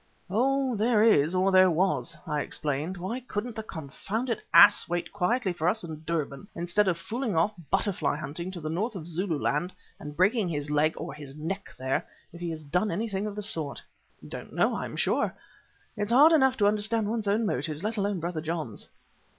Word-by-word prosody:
"Oh! 265 +3 +1
there 220 0 +3
is, 175 -7 +4
or 190 +1 +3
there 185 0 +7
was," 170 -1 0
I 150 -2 -1
explained. 150 +7 -2
"Why 190 +8 -3
couldn't 235 -2 -5
the 220 - -3
confounded 215 - -4
ass 200 -3 +7
wait 175 0 -2
quietly 205 +1 0
for 165 -1 -1
us 220 +3 0
at 160 -2 -8
Durban 160 +1 -3
instead 175 +4 +1
of 175 -3 +1
fooling 220 +4 -3
off 170 +7 +2 0.2
butterfly 195 -6 +1
hunting 155 +5 -5
to 185 -2 -7
the 155 - -5
north 210 +7 -2
of 165 -3 -6
Zululand 170 -1 -1 0.3
and 150 0 -8
breaking 195 +1 +3
his 145 -2 -3
leg 150 +1 +2
or - - -5
his 145 -2 -10
neck 165 +6 -4
there 130 +1 -1 0.3
if 170 - -11
he 175 - -2
has 160 -1 -5
done 180 +8 0
anything 210 -1 -2
of 205 - -6
the 210 - -3
sort?" 155 -7 0 0.5
"Don't - - -8
know, - - +2
I - - -3
am - - -7
sure. - - 0 0.6
It's 205 +2 -2
hard 290 +7 +7
enough 265 -5 +4
to 205 - +4
understand 215 +1 +2
one's 220 -1 -2
own 215 +3 +2
motives, 155 -1 -2
let 220 +2 -1
alone 200 -2 0
Brother 165 -1 -3
John's." 155 -9 -5
185 Hz, 195 wpm, -28 LUFS, 160-215 Hz, 0.6 s, there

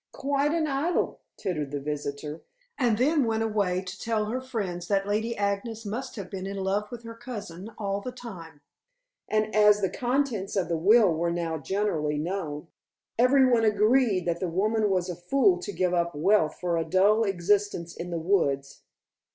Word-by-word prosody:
"Quite 280 +1 0
an 325 -1 +1
idyl," 300 +4 0 0.2
tittered 150 -6 -3
the 145 0 -3
visitor, 150 +1 -5 0.3
and 240 -5 +2
then 290 +4 +3
went 225 -1 0
away 200 -4 0
to 185 +2 -8
tell 220 -2 0
her 245 +5 -3
friends 195 -9 -4
that 195 -1 +1
Lady 220 +3 -1
Agnes 205 +3 -2
must 245 +5 -4
have 200 -5 -6
been 190 0 -6
in 200 0 -5
love 195 +2 -1
with 240 -1 -8
her 230 0 -8
cousin 210 -6 -8
all 200 -1 -2
the 250 - -5
time. 175 -12 -10 0.7
And 215 0 0
as 210 -1 +6
the 190 -2 0
contents 245 -6 -1
of 185 -4 0
the 170 - +1
will 200 +3 +5
were 170 +2 0
now 170 -2 -2
generally 155 -2 -1
known, 160 -2 -4 0.5
every 260 +2 +5
one 240 -3 +3
agreed 215 -2 +3
that 170 -1 -1
the 185 - -1
woman 210 +5 +1
was 185 -2 +1
a 180 - -4
fool 185 +1 +2
to 205 - -5
give 185 -2 0
up 170 -2 0
wealth 160 +1 +2
for 175 -1 0
a 165 - +1
dull 195 +7 +3
existence 195 -2 0
in 175 - -6
the 170 - -2
woods. 150 -6 0
200 Hz, 185 wpm, -27 LUFS, 175-225 Hz, 0.7 s, as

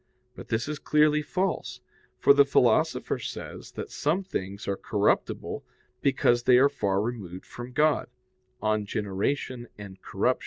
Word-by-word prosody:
But - - -10
this 115 +2 -1
is 150 0 -4
clearly 150 0 +3
false; 185 +5 -2 0.4
for 420 - +6
the 425 - +7
Philosopher - - +2
says - - -7
that 440 - -6
some 160 +6 0
things 100 - -5
are 100 - 0
corruptible - - 0 0.4
because 120 -3 +3
they 125 - +7
are 135 +3 +6
far 100 -8 0
removed 100 -5 -4
from 120 +1 -9
God 150 +3 +2 0.6
(De 110 0 +2
Gen. 105 +1 -3
et 105 -2 -4
Corrup. - - 0
120 Hz, 145 wpm, -27 LUFS, 105-150 Hz, 0.6 s, the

